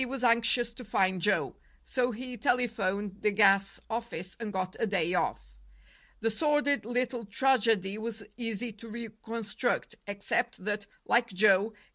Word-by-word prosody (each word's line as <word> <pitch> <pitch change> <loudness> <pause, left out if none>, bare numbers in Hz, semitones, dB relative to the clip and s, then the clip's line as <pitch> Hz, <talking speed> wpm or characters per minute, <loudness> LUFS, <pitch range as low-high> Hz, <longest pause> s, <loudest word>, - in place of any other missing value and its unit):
was 260 0 -4
anxious 235 0 +3
to 250 - -10
find 190 -4 +1
Joe; 210 - +1 0.3
so 250 -1 0
he 250 +2 -6
telephoned 210 -4 0
the 210 - +3
gas 195 -1 +4
office 220 -6 -4
and 225 -3 -4
got 185 -1 -3
a 225 - +1
day 180 -4 +1
off. - - -1 0.7
The 225 +1 +2
sordid 295 +1 +2
little 245 0 -1
tragedy 215 -3 +2
was 220 -1 -5
easy 230 0 -3
to 220 +2 -12
reconstruct, 225 +1 -3
except 200 +1 -2
that, 205 -1 -2 0.2
like 235 0 +3
Joe, 200 +1 +4
K. - - -27
220 Hz, 145 wpm, -30 LUFS, 200-240 Hz, 0.7 s, gas